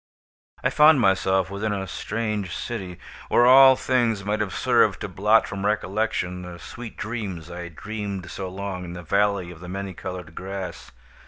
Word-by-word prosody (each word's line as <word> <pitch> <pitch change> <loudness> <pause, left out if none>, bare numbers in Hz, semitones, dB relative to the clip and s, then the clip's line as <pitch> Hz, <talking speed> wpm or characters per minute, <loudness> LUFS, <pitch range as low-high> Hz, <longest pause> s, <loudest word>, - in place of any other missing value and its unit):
I - - +2
found 150 -1 +6
myself 95 -2 +2
within 105 +2 -2
a 100 -2 -2
strange 105 -1 -3
city, 95 -7 -5 0.3
where 120 - +5
all 130 +1 +9
things 120 -6 0
might 105 +1 0
have 105 -3 -1
served - - +3
to - - -3
blot 105 +3 +3
from 95 0 -5
recollection 100 -3 -1
the 90 -1 -8
sweet 120 +6 -9
dreams 100 -8 -5
I 85 0 -6
had 85 -2 -11
dreamed 100 -2 -5
so 95 -1 -5
long 95 -1 -5
in 85 -1 -7
the 90 0 -8
Valley 100 0 +1
of 85 - -12
the 90 +1 -9
Many 95 0 -5
Colored 90 -2 -7
Grass. 95 +1 -6
100 Hz, 175 wpm, -24 LUFS, 90-110 Hz, 0.3 s, all